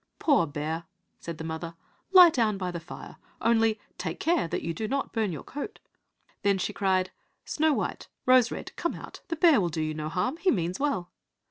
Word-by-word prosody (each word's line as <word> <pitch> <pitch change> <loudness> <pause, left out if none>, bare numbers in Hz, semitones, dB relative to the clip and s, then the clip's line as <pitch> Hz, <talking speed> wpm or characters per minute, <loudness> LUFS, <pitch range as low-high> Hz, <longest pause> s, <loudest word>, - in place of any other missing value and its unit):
"Poor 280 - +3
bear," 155 +3 -3 0.3
said 170 -1 -6
the 160 - -6
mother, 160 +1 -5 0.4
"lie 360 -3 +9
down 220 -7 +1
by 185 -2 -3
the 170 - -4
fire, 165 - -10 0.2
only 225 -1 +3 0.2
take 180 -1 -4
care 330 - +2
that - - -3
you 165 - -2
do 215 +6 -3
not 275 +4 -2
burn 220 -4 0
your 155 - -6
coat." 295 +10 -6 0.6
Then 200 -2 +3
she 185 - -2
cried, 185 -2 +1 0.3
"Snow 310 0 +2
white, - - -3 0.2
Rose 255 -2 +6
red, - - -7
come 340 - -2
out, - - -10
the 330 - -2
bear 315 - +5
will 175 - 0
do 160 -1 -2
you 155 0 -2
no 155 0 -4
harm, 185 - -1
he 365 +3 +1
means 175 - 0
well." 275 -12 -1
195 Hz, 205 wpm, -28 LUFS, 170-275 Hz, 0.6 s, lie